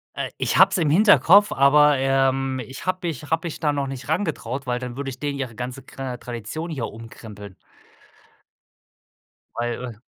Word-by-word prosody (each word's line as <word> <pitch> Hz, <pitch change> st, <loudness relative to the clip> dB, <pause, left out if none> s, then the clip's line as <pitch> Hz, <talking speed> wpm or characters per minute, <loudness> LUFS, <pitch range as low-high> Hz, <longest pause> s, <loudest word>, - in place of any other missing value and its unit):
Äh, -, -, -3 dB
ich -, -, 0 dB
habe -, -, +7 dB
es -, -, 0 dB
im 160 Hz, -4 st, +1 dB
Hinterkopf, 205 Hz, +2 st, +6 dB
aber, 145 Hz, +1 st, +5 dB
ähm, 135 Hz, 0 st, +1 dB
ich 130 Hz, +8 st, -10 dB
habe 185 Hz, -1 st, -2 dB
mich 155 Hz, -3 st, -5 dB
habe 165 Hz, +2 st, 0 dB
mich 160 Hz, -, -7 dB
da 150 Hz, -2 st, +1 dB
noch 140 Hz, -1 st, -2 dB
nicht 135 Hz, -2 st, -7 dB
rangetraut, 140 Hz, -, -2 dB
weil 125 Hz, 0 st, -1 dB
dann 125 Hz, -1 st, -6 dB
würde 140 Hz, -1 st, -4 dB
ich 125 Hz, -, -9 dB
denen 145 Hz, -1 st, -3 dB
ihre 120 Hz, -4 st, -5 dB
ganze 125 Hz, +2 st, -6 dB
kra 130 Hz, -2 st, -7 dB
Tradition 120 Hz, -, -6 dB
hier 135 Hz, -8 st, -3 dB
umkrempeln 105 Hz, -3 st, -11 dB, 2.0 s
weil 120 Hz, -1 st, -4 dB
135 Hz, 170 wpm, -23 LUFS, 125-150 Hz, 2.0 s, habe